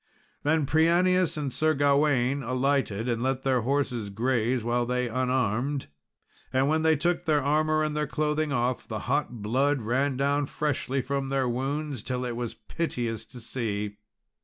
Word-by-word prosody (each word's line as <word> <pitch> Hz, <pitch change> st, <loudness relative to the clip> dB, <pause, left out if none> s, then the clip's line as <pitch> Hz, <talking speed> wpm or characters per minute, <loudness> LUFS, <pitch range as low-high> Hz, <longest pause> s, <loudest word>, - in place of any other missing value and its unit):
Then 155 Hz, 0 st, +2 dB
Prianius 170 Hz, +3 st, +3 dB
and 140 Hz, -4 st, -3 dB
Sir 155 Hz, +4 st, +2 dB
Gawain 140 Hz, -2 st, +2 dB
alighted 130 Hz, -3 st, 0 dB
and 120 Hz, -2 st, 0 dB
let 130 Hz, +1 st, -1 dB
their 130 Hz, -2 st, +2 dB
horses 125 Hz, -4 st, -1 dB
graze 120 Hz, +2 st, 0 dB
while 120 Hz, +1 st, +1 dB
they 125 Hz, 0 st, 0 dB
unarmed, 130 Hz, -, 0 dB, 0.6 s
and 130 Hz, +1 st, +2 dB
when 155 Hz, +2 st, +2 dB
they 160 Hz, 0 st, +4 dB
took 175 Hz, +4 st, 0 dB
their 150 Hz, -3 st, +2 dB
armour 155 Hz, +2 st, +2 dB
and 155 Hz, -1 st, -1 dB
their 150 Hz, -1 st, 0 dB
clothing 150 Hz, 0 st, 0 dB
off, 125 Hz, -1 st, -1 dB
the 110 Hz, -2 st, -4 dB
hot 125 Hz, -5 st, -1 dB
blood 130 Hz, +4 st, +1 dB
ran 130 Hz, +4 st, 0 dB
down 140 Hz, +1 st, +1 dB
freshly 135 Hz, -3 st, -1 dB
from 140 Hz, 0 st, -2 dB
their 135 Hz, -1 st, +1 dB
wounds 135 Hz, +2 st, -2 dB
till 125 Hz, +2 st, -3 dB
it 120 Hz, -1 st, -3 dB
was 120 Hz, -1 st, -4 dB
piteous 120 Hz, -9 st, -3 dB
to 125 Hz, -, -11 dB
see. 105 Hz, -4 st, -3 dB
135 Hz, 160 wpm, -27 LUFS, 120-150 Hz, 0.6 s, they